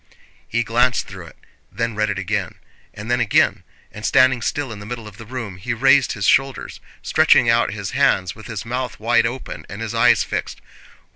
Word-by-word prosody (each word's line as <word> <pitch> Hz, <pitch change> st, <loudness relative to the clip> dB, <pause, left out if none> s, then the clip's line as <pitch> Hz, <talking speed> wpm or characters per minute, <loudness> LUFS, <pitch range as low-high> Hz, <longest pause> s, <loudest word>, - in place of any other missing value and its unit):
He 115 Hz, +1 st, 0 dB
glanced 120 Hz, +2 st, +1 dB
through -, -, -10 dB
it, -, -, -16 dB, 0.3 s
then 115 Hz, +2 st, -2 dB
read 105 Hz, 0 st, 0 dB
it 100 Hz, -, -2 dB
again, 95 Hz, -1 st, -2 dB, 0.4 s
and 110 Hz, +3 st, -7 dB
then 120 Hz, -, +2 dB
again, 115 Hz, -4 st, +2 dB, 0.3 s
and 105 Hz, -, -10 dB
standing 130 Hz, +1 st, +4 dB
still 140 Hz, +2 st, -2 dB
in 105 Hz, -, -8 dB
the 105 Hz, -, -9 dB
middle 115 Hz, -2 st, -6 dB
of 105 Hz, -1 st, -13 dB
the 115 Hz, -2 st, -11 dB
room 115 Hz, -7 st, -6 dB
he 115 Hz, +6 st, -3 dB
raised 135 Hz, +3 st, +4 dB
his 100 Hz, -4 st, -3 dB
shoulders, 135 Hz, +4 st, +1 dB, 0.2 s
stretching -, -, +4 dB
out -, -, +2 dB
his -, -, -5 dB
hands, 95 Hz, 0 st, +2 dB
with 110 Hz, -, -12 dB
his 110 Hz, -3 st, -6 dB
mouth 125 Hz, -4 st, -4 dB
wide 115 Hz, +1 st, +2 dB
open 125 Hz, +2 st, -7 dB
and -, -, -8 dB
his -, -, -4 dB
eyes -, -, +4 dB
fixed. -, -, -4 dB
115 Hz, 200 wpm, -20 LUFS, 105-125 Hz, 0.4 s, standing